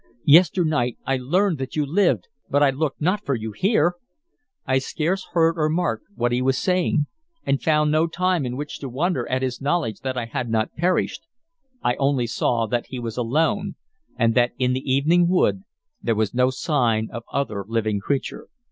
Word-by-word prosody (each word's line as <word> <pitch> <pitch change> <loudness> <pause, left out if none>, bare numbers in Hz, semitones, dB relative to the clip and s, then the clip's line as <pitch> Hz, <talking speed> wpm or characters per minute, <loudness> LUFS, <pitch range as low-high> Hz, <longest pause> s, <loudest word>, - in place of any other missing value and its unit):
Yesternight 155 -5 +4
I 135 - +1
learned 170 +6 +1
that 130 0 -5
you 150 -1 +1
lived, 145 - +1 0.2
but 145 +1 +3
I 140 - +5
looked 140 +1 -3
not 190 +6 +1
for 140 - 0
you 110 -1 -5
here." 175 - +2 0.7
I 130 0 +2
scarce 170 +8 -2
heard 165 0 +3
or 155 0 +2
marked 155 -9 -1
what 120 0 0
he 125 +1 +1
was 130 +1 +1
saying, 180 -4 +1 0.4
and 140 0 +1
found 150 -1 +2
no 155 +2 +3
time 180 -1 0
in 125 0 -4
which 145 +1 -6
to 135 - -6
wonder 135 0 -1
at 130 +1 0
his 130 0 -3
knowledge 140 - -1
that 130 -1 -4
I 120 - -1
had 120 +1 -4
not 110 0 0
perished. 175 +3 0 0.6
I 120 - +2
only 135 -3 +1
saw 115 0 0
that 120 +1 -2
he 130 - -6
was 115 -2 -5
alone, 160 - 0 0.4
and 115 0 +3
that 120 +1 +2
in 125 -1 +1
the 130 +1 -2
evening 165 +6 +3
wood 100 - +1 0.4
there 115 - 0
was 105 -2 0
no 125 +1 +3
sign 120 -5 0
of 115 - -5
other 110 -8 -2
living 110 -2 0
creature. 135 +7 -3
135 Hz, 190 wpm, -23 LUFS, 120-165 Hz, 0.7 s, I